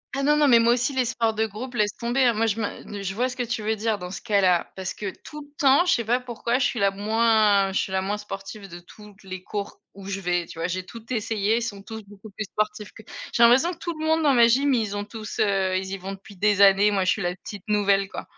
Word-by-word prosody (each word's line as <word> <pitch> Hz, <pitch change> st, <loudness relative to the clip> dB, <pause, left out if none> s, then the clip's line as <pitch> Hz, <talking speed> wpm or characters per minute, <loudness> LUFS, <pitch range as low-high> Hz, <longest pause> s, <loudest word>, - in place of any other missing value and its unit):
Ah 275 Hz, -, -1 dB
non, 295 Hz, +1 st, +3 dB
non 300 Hz, -1 st, +4 dB
mais 235 Hz, -3 st, +6 dB
moi 235 Hz, +1 st, +4 dB
aussi 250 Hz, +3 st, 0 dB
les 260 Hz, -, +2 dB
sports 230 Hz, -2 st, 0 dB
de 220 Hz, +1 st, 0 dB
groupe 240 Hz, +5 st, -7 dB
laisse 210 Hz, -3 st, +1 dB
tomber, 240 Hz, +3 st, 0 dB
hein, 240 Hz, -, +4 dB
moi 225 Hz, +1 st, +1 dB
je 220 Hz, +1 st, -1 dB
me 205 Hz, -1 st, -5 dB
je 190 Hz, 0 st, -3 dB
vois 245 Hz, +5 st, 0 dB
ce 250 Hz, -, -7 dB
que 250 Hz, -, -2 dB
tu 235 Hz, -1 st, -3 dB
veux 220 Hz, +1 st, -1 dB
dire 220 Hz, -1 st, -1 dB
dans 180 Hz, 0 st, -7 dB
ce 190 Hz, -, -7 dB
cas-là 190 Hz, -5 st, +2 dB
parce 185 Hz, -1 st, -4 dB
que 200 Hz, -2 st, -5 dB
tout 300 Hz, -1 st, -9 dB
le 290 Hz, -, -14 dB
temps, 280 Hz, +5 st, +5 dB
je 355 Hz, -, +3 dB
sais 235 Hz, -2 st, -1 dB
pas 245 Hz, +3 st, +2 dB
pourquoi 240 Hz, 0 st, -2 dB
je 255 Hz, -, +2 dB
suis 240 Hz, -, -1 dB
la 200 Hz, -1 st, +3 dB
moins 210 Hz, -1 st, +2 dB
je -, -, +1 dB
suis 190 Hz, -, -3 dB
la 190 Hz, -, 0 dB
moins 205 Hz, +2 st, -2 dB
sportive 195 Hz, 0 st, -8 dB
de 175 Hz, 0 st, -9 dB
toutes 205 Hz, +3 st, -16 dB
les 185 Hz, -1 st, -8 dB
cours 205 Hz, 0 st, -6 dB
où 195 Hz, -1 st, -11 dB
je 195 Hz, 0 st, -3 dB
vais, 175 Hz, -2 st, 0 dB
tu 165 Hz, -, -11 dB
vois? 165 Hz, -, -1 dB
J'ai 185 Hz, +1 st, -4 dB
tout 230 Hz, +3 st, -12 dB
essayé, 220 Hz, -1 st, 0 dB
ils 235 Hz, -, -1 dB
sont 205 Hz, -4 st, -5 dB
tous 220 Hz, 0 st, -8 dB
beaucoup 205 Hz, +1 st, -13 dB
plus 210 Hz, +2 st, -5 dB
sportifs 210 Hz, 0 st, -3 dB
que 220 Hz, -, -13 dB, 0.3 s
j'ai 235 Hz, -, +4 dB
l'impression 265 Hz, +10 st, +5 dB
que -, -, -13 dB
tout 340 Hz, -, -4 dB
le 315 Hz, -, -3 dB
monde 320 Hz, 0 st, +2 dB
dans 285 Hz, -3 st, +4 dB
ma 235 Hz, -1 st, +6 dB
gym 275 Hz, +4 st, +3 dB
ils 220 Hz, -4 st, -1 dB
ont 205 Hz, -, -3 dB
tous 215 Hz, +1 st, -8 dB
heu, 195 Hz, -3 st, +1 dB
ils 190 Hz, -, -4 dB
y 195 Hz, -, -3 dB
vont 195 Hz, +1 st, -6 dB
depuis 195 Hz, 0 st, -13 dB
des 205 Hz, +1 st, +2 dB
années, 200 Hz, +1 st, +6 dB
moi 195 Hz, -2 st, +1 dB
je 185 Hz, -, +2 dB
suis 220 Hz, -, -1 dB
la 175 Hz, -1 st, -2 dB
petite 200 Hz, 0 st, -10 dB
nouvelle, 200 Hz, -2 st, +2 dB
quoi. -, -, -7 dB
210 Hz, 290 wpm, -24 LUFS, 195-235 Hz, 0.3 s, mais